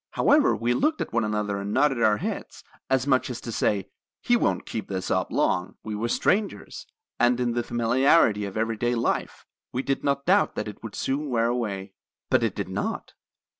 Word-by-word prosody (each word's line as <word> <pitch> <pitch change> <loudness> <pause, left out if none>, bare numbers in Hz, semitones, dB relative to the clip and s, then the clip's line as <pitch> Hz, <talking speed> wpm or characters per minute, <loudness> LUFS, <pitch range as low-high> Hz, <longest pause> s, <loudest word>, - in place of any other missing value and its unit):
However - - +4
we 120 +2 0
looked 310 - +1
at - - -4
one 120 0 +2
another 105 -1 -1
and 100 +1 -4
nodded 135 -1 +2
our 105 -2 +4
heads, - - -5 0.3
as 135 -1 +2
much 130 -2 +2
as 125 - -5
to 115 - -6
say, 100 -3 0 0.4
'He 240 - +3
won't 235 - 0
keep 110 -3 -5
this 95 -1 -3
up - - 0
long.' 90 0 0
We 110 - -5
were 110 +3 -2
strangers, 200 - -1 0.3
and 120 -1 +3
in 120 -1 +1
the 120 - 0
familiarity 120 -1 +3
of 100 +1 -6
every 110 0 -1
day 120 +2 0
life 115 - -2 0.3
we 130 - -2
did 135 - -1
not 140 -1 0
doubt 195 +3 +3
that 105 - -3
it 105 - -9
would 110 -2 -8
soon 145 +2 -2
wear 115 -2 +1
away. 100 -5 -3 0.4
"But - - +4
it - - 0
did - - -3
not. - - -4
120 Hz, 205 wpm, -25 LUFS, 105-135 Hz, 0.4 s, However